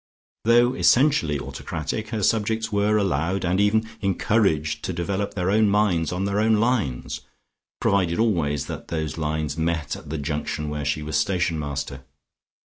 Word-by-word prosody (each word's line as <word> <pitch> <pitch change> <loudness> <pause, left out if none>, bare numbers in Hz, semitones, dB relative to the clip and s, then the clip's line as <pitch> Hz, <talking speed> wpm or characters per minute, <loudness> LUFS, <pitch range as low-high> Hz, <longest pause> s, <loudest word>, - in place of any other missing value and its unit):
Though 120 +2 +5
essentially 125 - +3
autocratic, 85 +10 -4
her 110 -2 -2
subjects 110 +2 +1
were 105 +1 +2
allowed 95 -1 0
and 90 +3 +2
even 110 +2 +2
encouraged 95 -6 +1
to - - -2
develop 100 +4 -2
their 90 0 0
own 110 0 +4
minds 100 -6 +2
on 90 +2 -1
their 100 +1 0
own 110 +1 +4
lines, 105 - 0 0.6
provided 90 -4 +1
always 85 - +1
that - - -7
those 80 -1 -3
lines 75 0 -2
met 80 -2 -1
at 75 - -11
the 80 - -3
junction 75 +1 -3
where 75 -1 -3
she 75 +1 -1
was 75 0 -1
station 85 0 0
master. 70 -2 -4
90 Hz, 155 wpm, -24 LUFS, 75-105 Hz, 0.6 s, Though